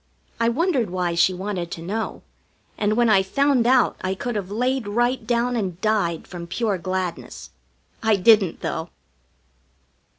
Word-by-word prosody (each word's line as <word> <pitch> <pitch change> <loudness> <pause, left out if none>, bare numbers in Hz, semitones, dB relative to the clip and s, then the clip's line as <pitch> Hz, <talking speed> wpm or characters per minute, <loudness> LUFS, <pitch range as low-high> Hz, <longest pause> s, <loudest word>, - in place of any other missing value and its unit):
I 230 0 +3
wondered 270 - +1
why 180 -1 -1
she 170 +2 +4
wanted 185 -2 -4
to 165 - -7
know, 215 +5 -4 0.5
and 215 +1 0
when 240 -1 +4
I 205 -3 +5
found 265 +4 +2
out 255 0 +3
I 190 +1 -2
could 240 +4 -4
have 195 -3 -3
laid 250 +2 -1
right 240 +5 0
down 245 +1 +1
and 185 -6 -3
died 200 -7 0
from 170 -2 -8
pure 200 +1 -1
gladness. 185 0 -4 0.5
I 220 -1 +3
didn't, 195 -2 +4
though. 165 +1 -3
210 Hz, 155 wpm, -23 LUFS, 185-240 Hz, 0.5 s, I